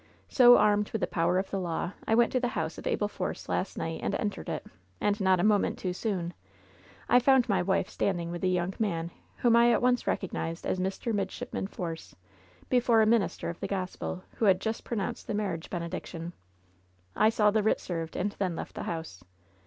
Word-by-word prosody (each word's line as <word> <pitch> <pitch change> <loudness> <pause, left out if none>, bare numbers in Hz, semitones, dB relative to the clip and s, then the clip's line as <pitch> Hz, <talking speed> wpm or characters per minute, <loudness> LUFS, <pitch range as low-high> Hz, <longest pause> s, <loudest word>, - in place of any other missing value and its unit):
So 245 -2 +8
armed 210 0 +3
with 220 - -3
the - - +3
power 175 +1 +1
of 190 +1 -2
the 195 - -1
law, 175 0 -2 0.2
I 220 - +3
went 235 0 +4
to 255 - +1
the 245 - 0
house 160 +1 -2
of - - -6
Abel 205 - +1
Force 190 -3 -5
last 190 - -2
night 165 0 -3
and - - -1
entered 205 -1 -3
it, - - -4 0.3
and 205 0 0
not 190 -1 +4
a - - +1
moment 210 -1 +2
too 180 -1 -3
soon. 180 -4 -2 0.7
I - - +6
f 250 - +2
oimd 265 -3 +6
my 195 -5 +2
wife 190 +2 +1
standing 170 -3 -1
with 175 +1 -5
a - - +3
young 180 0 0
man 170 -6 -1 0.2
whom 235 -1 +3
I 235 0 +6
at 230 - +3
once 245 0 +2
recog 190 - -1
nized 165 +1 -4
as 185 - -1
Mr. 190 +5 -2
Midshipman 210 +1 -3
Force, 165 -4 -6 0.5
before 240 -3 +4
a - - +4
minister 220 -2 +1
of 170 0 -5
the - - -3
Gospel 185 -1 -4
who 225 - +1
had 190 -2 +5
just 220 +2 -3
pronounced 210 -5 -4
the 210 - -2
marriage 195 -6 -3
bene 170 -2 -3
diction. 170 -1 -6 0.8
I 215 - +5
saw 210 -2 +3
the 215 +1 +2
writ 220 - +2
served, 165 -2 -5
and 200 +3 -1
then 185 -4 -2
left - - -6
the - - -5
house. 160 - -6
195 Hz, 215 wpm, -29 LUFS, 175-220 Hz, 0.8 s, So